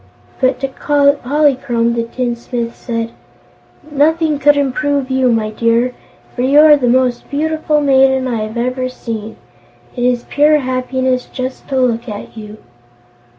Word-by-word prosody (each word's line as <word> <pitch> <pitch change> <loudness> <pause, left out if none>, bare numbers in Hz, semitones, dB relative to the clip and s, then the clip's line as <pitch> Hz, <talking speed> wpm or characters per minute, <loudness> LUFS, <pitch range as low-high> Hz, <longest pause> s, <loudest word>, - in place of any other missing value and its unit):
But 255 -1 +1
to 270 - 0
Polychrome 280 -4 +1
the 235 - -1
tinsmith 235 0 -4
said: 230 -2 -4 0.8
"Nothing 305 +1 +1
could 290 +1 +4
improve 280 0 -1
you, 260 -1 +2
my 220 -2 0
dear, 230 +3 +1 0.4
for 245 - -3
you 275 +3 +4
are 305 -1 +7
the 265 -4 -1
most 250 0 +1
beautiful 310 +1 0
maiden 265 -2 +3
I 240 -2 -2
have 215 +2 -5
ever 255 +1 -2
seen. 225 -3 -6 0.6
It 245 - -3
is 245 -1 +1
pure 300 +1 +3
happiness 255 -1 -1
just 255 0 -6
to 270 - -2
look 240 -1 0
at 205 +1 -8
you." 215 -1 -9
255 Hz, 145 wpm, -15 LUFS, 235-280 Hz, 0.8 s, are